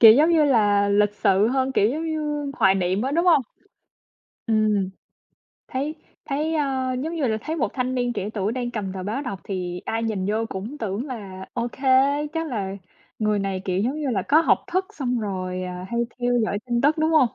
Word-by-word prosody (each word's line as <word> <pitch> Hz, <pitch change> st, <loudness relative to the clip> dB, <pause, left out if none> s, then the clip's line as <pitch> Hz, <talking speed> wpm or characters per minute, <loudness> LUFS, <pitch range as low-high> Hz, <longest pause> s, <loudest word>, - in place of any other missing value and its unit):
Kiểu, 220 Hz, -2 st, +11 dB
giống 305 Hz, +7 st, +5 dB
như 320 Hz, -3 st, +5 dB
là, 205 Hz, -6 st, +3 dB
lịch 205 Hz, 0 st, +3 dB
sự 200 Hz, +2 st, +3 dB
hơn, 265 Hz, +1 st, 0 dB
kiểu, 205 Hz, -3 st, +3 dB
giống 310 Hz, +6 st, -2 dB
như 295 Hz, -2 st, -2 dB
hoài 190 Hz, 0 st, +5 dB
niệm 190 Hz, +3 st, 0 dB
á, 265 Hz, -, -1 dB
đúng 340 Hz, +4 st, +1 dB
hông? 320 Hz, -6 st, +6 dB, 1.1 s
Ừm, 215 Hz, -3 st, +2 dB, 0.8 s
thấy 285 Hz, +4 st, -2 dB, 0.3 s
thấy, 305 Hz, +3 st, -1 dB
a, 265 Hz, -4 st, 0 dB
giống 295 Hz, +7 st, -3 dB
như 300 Hz, -6 st, 0 dB
là 220 Hz, -1 st, 0 dB
thấy 320 Hz, +5 st, -4 dB
một -, -, +1 dB
thanh 255 Hz, 0 st, -1 dB
niên 245 Hz, -1 st, 0 dB
trẻ 205 Hz, -2 st, -3 dB
tuổi 205 Hz, +2 st, 0 dB
đang 245 Hz, -1 st, -2 dB
cầm 200 Hz, -5 st, -4 dB
tờ 190 Hz, -1 st, -5 dB
báo 220 Hz, +9 st, -2 dB
đọc 200 Hz, -8 st, -5 dB
thì 180 Hz, -2 st, -4 dB
ai 225 Hz, +1 st, -2 dB
nhìn 205 Hz, -4 st, -1 dB
vô 220 Hz, +2 st, 0 dB
cũng 220 Hz, +10 st, -6 dB
tưởng 220 Hz, +5 st, -3 dB
là 195 Hz, -7 st, -7 dB
ô 240 Hz, -2 st, -1 dB
kê, 265 Hz, 0 st, -3 dB, 0.4 s
chắc 325 Hz, 0 st, -2 dB
là 200 Hz, -5 st, -3 dB, 0.4 s
người 210 Hz, -1 st, +1 dB
này, 195 Hz, -1 st, -2 dB
kiểu, 185 Hz, -2 st, 0 dB
giống 270 Hz, +7 st, -1 dB
như 290 Hz, -, -1 dB
là, 195 Hz, -5 st, 0 dB
có 310 Hz, +3 st, +6 dB
học -, -, +2 dB
thức 375 Hz, +1 st, +2 dB
xong 250 Hz, -5 st, -1 dB
rồi, 185 Hz, -3 st, -3 dB
à, 180 Hz, 0 st, -5 dB
hay 235 Hz, 0 st, 0 dB, 0.2 s
theo 245 Hz, 0 st, +1 dB
dõi 205 Hz, -, -1 dB
tin 240 Hz, -1 st, +1 dB
tức, 300 Hz, +3 st, +3 dB
đúng 315 Hz, +1 st, +2 dB
hông? 305 Hz, -7 st, +5 dB
235 Hz, 220 wpm, -24 LUFS, 200-280 Hz, 1.1 s, Kiểu